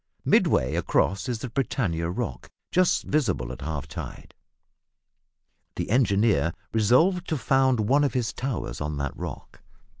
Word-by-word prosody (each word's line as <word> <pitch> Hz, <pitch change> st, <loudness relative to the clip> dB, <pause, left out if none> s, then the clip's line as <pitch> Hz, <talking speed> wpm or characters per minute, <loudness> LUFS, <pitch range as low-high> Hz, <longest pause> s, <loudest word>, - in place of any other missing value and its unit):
Midway 65 Hz, -, +3 dB
across 100 Hz, +6 st, +1 dB
is 120 Hz, -, -1 dB
the 125 Hz, +3 st, -6 dB
Britannia 100 Hz, -11 st, -1 dB
Rock, 65 Hz, -8 st, -4 dB, 0.2 s
just 185 Hz, 0 st, +3 dB
visible 95 Hz, -, 0 dB
at 65 Hz, +1 st, -9 dB
half 70 Hz, -1 st, -4 dB
tide. 70 Hz, -, -8 dB, 1.4 s
The -, -, -3 dB
engineer 100 Hz, -, +3 dB, 0.2 s
resolved 160 Hz, -, +3 dB
to 160 Hz, -, -1 dB
found 130 Hz, -1 st, +2 dB
one 135 Hz, +7 st, +3 dB
of 140 Hz, -4 st, 0 dB
his 120 Hz, -3 st, 0 dB
towers 110 Hz, -, -4 dB
on 75 Hz, 0 st, -3 dB
that 70 Hz, -1 st, -3 dB
rock. -, -, -8 dB
110 Hz, 140 wpm, -26 LUFS, -, 1.4 s, Midway